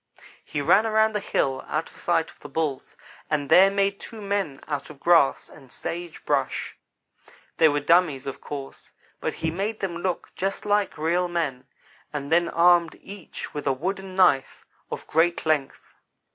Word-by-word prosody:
"He 145 - -3
ran 195 +9 +4
around 220 0 +3
the 210 - 0
hill 135 -8 -1
out - - -2
of - - -21
sight - - 0
of - - -24
the - - -10
Bulls, 155 -5 -3 0.3
and 145 -2 -1
there 190 +2 +8
made 200 0 0
two 225 - -9
men 200 -9 -2
out 145 -2 -3
of 150 -2 -12
grass 165 -5 +4
and 130 -2 -16
sage 170 0 -6
brush. - - -1 0.8
They 160 - +6
were 145 0 0
dummies, 165 -3 +3
of 135 - -6
course, 140 -2 -8 0.3
but - - -3
he 160 - -2
made 205 +6 -3
them 180 -4 -3
to - - -7
look 185 -1 -3
just 195 +2 -3
like 205 -3 +1
real 170 +3 +1
men, 145 -7 -3 0.4
and 145 0 -5
then 170 +1 +3
armed 170 -1 +4
each 195 -4 -9
with 145 -1 -4
a 135 - +3
wooden 190 +6 -4
knife 180 -8 +3 0.2
of - - -6
great 170 +2 +1
length. 150 -4 -1
170 Hz, 175 wpm, -25 LUFS, 145-195 Hz, 0.8 s, there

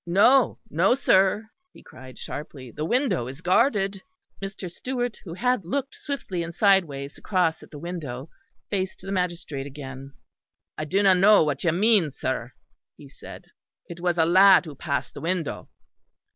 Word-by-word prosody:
No, 225 +9 +4
no, 195 +4 +2
sir," 210 -3 +2 0.2
he - - -16
cried 130 0 -13
sharply, 135 -4 -8
"the 150 - -4
window 245 - +1
is 135 +5 -9
guarded." 195 +1 +2 0.4
Mr. 195 -1 -6
Stewart, 245 +3 -4
who 165 -2 -7
had 250 +1 0
looked 270 +10 -3
swiftly 235 -11 -5
and 170 0 -6
sideways 165 -9 +1
across 180 -5 0
at - - -14
the 150 - -10
window, 145 -5 -6 0.4
faced 190 -2 -2
the 195 +1 -7
magistrate 175 -7 -3
again. 135 -1 -9 0.6
"I 155 - -4
do 195 +7 +1
not 190 -2 +5
know 205 0 +6
what 145 -3 -2
you 170 - +3
mean, 200 -1 +3
sir," 130 -2 -4 0.4
he - - -14
said. - - -12 0.4
"It 170 0 -9
was 175 0 0
a 160 - +4
lad 190 +2 +6
who 155 - -8
passed 140 0 -3
the - - -9
window." 170 -2 -2
180 Hz, 160 wpm, -25 LUFS, 150-200 Hz, 0.6 s, know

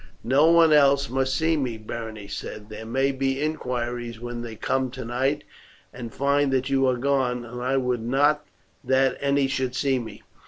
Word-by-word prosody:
"No 135 +6 +4
one 165 -2 +6
else 140 -2 +4
must 130 0 0
see 160 +1 +2
me," 130 -6 -2
Berenice 110 -2 -7
said. 105 +2 -7
"There 110 +1 -8
may 135 +4 +1
be 135 0 -1
inquiries 120 -6 -3
when 120 0 -5
they 115 -2 -7
come 130 +4 -1
tonight 130 +3 -2 0.5
and 120 -2 -7
find 140 +1 +1
that 135 +1 0
you 135 -1 +3
are 125 -1 +1
gone, 125 -2 0
and 120 +1 -7
I 130 +2 0
would 125 -2 0
not 145 +5 +2 0.4
that 130 0 +2
any 140 0 +2
should 130 -2 -2
see 135 -1 +1
me." 110 -4 -9
130 Hz, 180 wpm, -25 LUFS, 120-140 Hz, 0.5 s, one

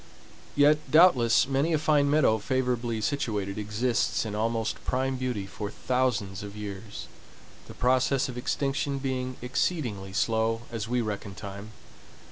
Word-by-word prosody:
Yet 145 +1 +5
doubtless 130 -9 +5
many 140 +5 +1
a - - +4
fine 145 -1 +3
meadow 140 -7 +3
favorably 120 -1 -1
situated 105 -5 -2
exists 110 +3 0
in 105 - -4
almost 110 +1 -1
prime 130 +1 0
beauty 125 -6 -2
for 100 +1 -6
thousands 105 -6 -1
of 100 0 -8
years, 105 0 -7 0.6
the - - -11
process 130 +2 +2
of 125 - -7
extinction 140 +2 -1
being 130 -1 -3
exceedingly 125 - -1
slow, 115 +3 0
as 115 -2 -4
we 125 +1 +1
reckon 100 -3 -4
time. 100 +1 -8
120 Hz, 135 wpm, -27 LUFS, 105-130 Hz, 0.6 s, Yet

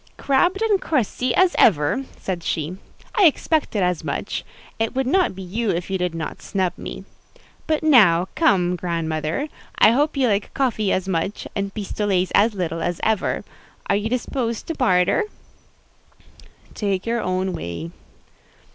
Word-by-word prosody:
"Crabbed 350 +10 +2
and 420 -4 +2
crusty 255 -3 0
as 370 -1 +4
ever!" 180 - +3
said 180 -3 -4
she. 160 +1 -2 0.4
"I 400 - +7
expected 300 - +2
as 180 -2 0
much: - - -3 0.4
it 225 +2 -1
would 265 0 +1
not 345 - +2
be 190 - -7
you 210 +5 -2
if 175 +1 -2
you 190 - 0
did 180 -2 -1
not 160 -1 -5
snub 190 -3 -1
one. - - -8 0.6
But 310 -1 0
now, 195 - +5
come, 180 - +3
grand 170 -2 -2
mother, 155 - -2 0.3
I 215 - +7
hope 290 +4 +1
you 265 -2 +3
like 205 -2 -1
coffee 220 -7 +1
as 190 0 0
much, 190 +2 -2
and 200 -1 -2
pistolets 200 -3 -1
as 215 +1 +4
little 165 -3 -2
as 175 +1 -2
ever: 220 -2 0 0.5
are 195 - +4
you 210 +2 -1
disposed 235 -1 -2
to - - 0
barter?" 220 - +2 1.5
"Take 195 -3 -2
your 235 0 0
own 185 0 -1
way." 85 - -5
200 Hz, 155 wpm, -22 LUFS, 180-255 Hz, 1.5 s, I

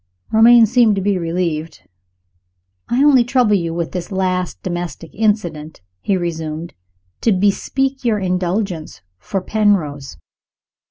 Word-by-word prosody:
Romayne 230 +1 +7
seemed 230 -1 +3
to 195 - -2
be 200 -2 +1
relieved. 165 - -3 1.1
"I 250 +4 +2
only 275 -4 +5
troubled 240 -5 +2
you 170 -1 -3
with 170 0 -3
this 180 0 -5
last 185 -2 -2
domestic 175 -2 -5
incident," 175 - -2 0.2
he 195 - 0
resumed, 165 -1 -4 0.5
"to 230 - +2
bespeak 260 +8 0
your 230 -3 +1
indulgence 180 - -3 0.2
for 195 - -3
Penrose. 180 - 0
185 Hz, 120 wpm, -18 LUFS, 170-220 Hz, 1.1 s, Romayne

